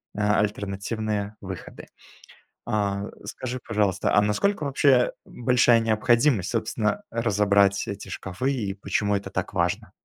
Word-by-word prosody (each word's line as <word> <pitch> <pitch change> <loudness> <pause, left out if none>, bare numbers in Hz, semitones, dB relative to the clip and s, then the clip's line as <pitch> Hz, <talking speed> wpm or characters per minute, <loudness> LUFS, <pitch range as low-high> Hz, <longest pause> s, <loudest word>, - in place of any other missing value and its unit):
э, - - -5
альтернативные 105 0 -1
выходы. 95 -3 -8 0.8
А, 100 -1 -1 0.2
скажи, 130 0 -5
пожалуйста, 105 -4 +1
а 105 - +6
насколько 150 - +1
вообще, 140 +1 0
э, 125 -2 +4
большая 120 -1 +3
необходимость, 115 -1 +2
собственно, 110 - -1
разобрать 100 -3 +2
эти 100 0 -6
шкафы 110 +9 -3
и 105 -6 -2
почему 100 +1 0
это 100 - -3
так - - -3
важно? - - -1
105 Hz, 125 wpm, -25 LUFS, 100-120 Hz, 0.8 s, а